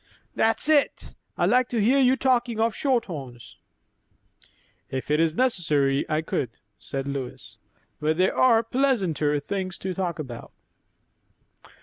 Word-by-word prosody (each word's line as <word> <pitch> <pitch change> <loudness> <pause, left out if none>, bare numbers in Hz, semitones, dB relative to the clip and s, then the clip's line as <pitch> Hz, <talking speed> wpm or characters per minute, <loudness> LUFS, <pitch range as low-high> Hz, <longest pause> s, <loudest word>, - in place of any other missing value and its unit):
'" - - -41
"That's 225 +5 +2
it. 300 -2 +1 0.2
I'd - - +2
like 250 0 +3
to 235 - -1
hear 245 +7 +3
you 260 -1 +4
talking 245 -4 +1
of 225 0 +2
shorthorns." 165 - -3 1.3
"If 130 +2 -4
it 150 - +3
is 165 -1 +2
necessary, 150 - +1
I 155 0 0
could," 130 -5 -2 0.3
said 135 0 -5
Lois; 140 -2 -6 0.4
"but 155 +1 0
there 185 +1 +2
are 230 -3 +4
pleasanter 195 - +1
things 185 +3 -4
to 190 0 -4
talk 180 -2 -3
about." 130 -7 -8
185 Hz, 135 wpm, -25 LUFS, 150-245 Hz, 1.3 s, you